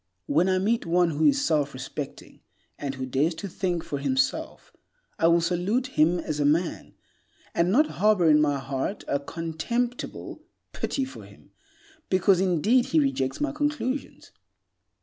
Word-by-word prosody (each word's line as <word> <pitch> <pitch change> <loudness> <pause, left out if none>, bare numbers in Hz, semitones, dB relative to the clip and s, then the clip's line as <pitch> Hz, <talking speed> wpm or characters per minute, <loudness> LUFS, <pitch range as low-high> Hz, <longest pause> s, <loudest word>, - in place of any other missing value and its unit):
When 165 - +2
I 185 - +2
meet 210 +2 0
one 175 0 +3
who 155 +1 0
is 285 0 +3
self 145 - +1
respecting, 135 +2 -7 0.4
and 140 -2 -4
who 130 0 -4
dares 140 +6 0
to 200 +5 -6
think 175 -2 -2
for 150 -4 -4
himself, 135 -1 -1 0.5
I 165 - +4
will 170 0 +4
salute 195 +10 -1
him 165 +4 +4
as 155 -3 -4
a - - +2
man, 160 +4 0 0.6
and 170 +2 +2
not 290 +9 +5 0.2
harbor 210 -5 +4
in 150 -1 +6
my 145 -2 +2
heart 135 +8 -4
a 140 - 0
contemptible 165 - -4 0.3
pity 270 - -2
for 265 - -10
him, - - -18 0.6
because, 185 0 +3
indeed, 195 +8 +3
he 320 - +3
rejects 135 - 0
my 295 0 0
conclusions. 295 -2 -3
170 Hz, 155 wpm, -26 LUFS, 150-225 Hz, 0.6 s, in